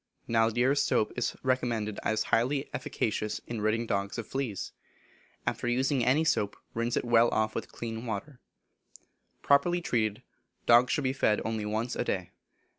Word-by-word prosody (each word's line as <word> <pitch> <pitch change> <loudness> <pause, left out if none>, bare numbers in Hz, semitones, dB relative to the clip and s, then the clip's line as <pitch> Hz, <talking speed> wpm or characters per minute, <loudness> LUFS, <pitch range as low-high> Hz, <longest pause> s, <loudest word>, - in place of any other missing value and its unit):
Naldire's 120 +5 +3
soap 105 - +1
is - - -1
recommended 120 -5 0
as 110 0 0
highly 135 +5 +2
efficacious 105 0 -2
in 115 -3 -4
ridding 110 +2 +1
dogs 100 -1 -2
of 115 - -4
fleas. 130 -6 -3 0.7
After - - -2
using 130 +1 +1
any 135 +7 +3
soap 105 -10 +1 0.2
rinse 115 +1 -1
it - - -1
well 120 0 +5
off 110 0 0
with 115 - -5
clean 115 +1 -5
water. 120 +5 -5 1.0
Properly 160 +5 +4
treated, 110 -10 -1 0.4
dogs 120 +1 +6
should 145 - 0
be 130 0 +1
fed 110 -6 +2
only 110 -2 -2
once 110 +4 -2
a - - 0
day. 95 -6 -2
115 Hz, 155 wpm, -29 LUFS, 110-130 Hz, 1.0 s, dogs